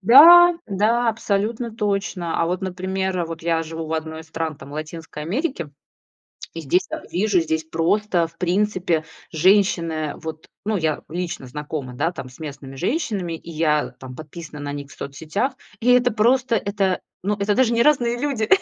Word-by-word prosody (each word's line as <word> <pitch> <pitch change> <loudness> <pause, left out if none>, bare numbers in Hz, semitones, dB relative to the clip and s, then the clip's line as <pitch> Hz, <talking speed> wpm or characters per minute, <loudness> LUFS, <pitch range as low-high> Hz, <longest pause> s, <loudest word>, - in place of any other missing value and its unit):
Да, 335 - +9
да, 225 +4 +2
абсолютно 220 +2 -2
точно. 195 -5 -1
А 165 - +2
вот, 180 +2 -2
например, 185 -1 -2
вот 165 0 -7
я 165 -1 +1
живу 160 0 -6
в 160 - -4
одной 160 0 -3
из 160 - -13
стран 160 -2 -3
там 140 +1 -12
Латинской 155 0 -6
Америки, 205 - -2 0.8
и 165 - -5
здесь 175 +6 +1 0.2
вижу, 195 -1 +2
здесь 160 0 -1
просто 170 +2 +1
в 165 - -20
принципе 180 -3 +1 0.3
женщины, 175 0 +3
э, 155 -2 -2
вот 160 -1 -7 0.2
Ну, 215 -1 +1
я 155 -3 -1
лично 175 -3 -4
знакома, 145 -1 -5
да, 165 +7 0
там 130 - -7
с 125 - -16
местными 140 -3 -8
женщинами, 200 - -1
и 165 +1 -8
я 155 -2 +1
там 130 -1 -9
подписана 155 +1 -9
на 145 0 -4
них 140 0 -7
в - - -12
соцсетях. 160 - -3 0.3
И 245 - +3
это 245 0 +5
просто, 240 +3 +3
это 200 -3 0 0.2
ну, 205 +3 +1
это 205 +1 +1
даже 245 -1 +3
не 235 - +4
разные 240 -5 +3
люди- 265 -7 -1
175 Hz, 175 wpm, -22 LUFS, 160-210 Hz, 0.8 s, Да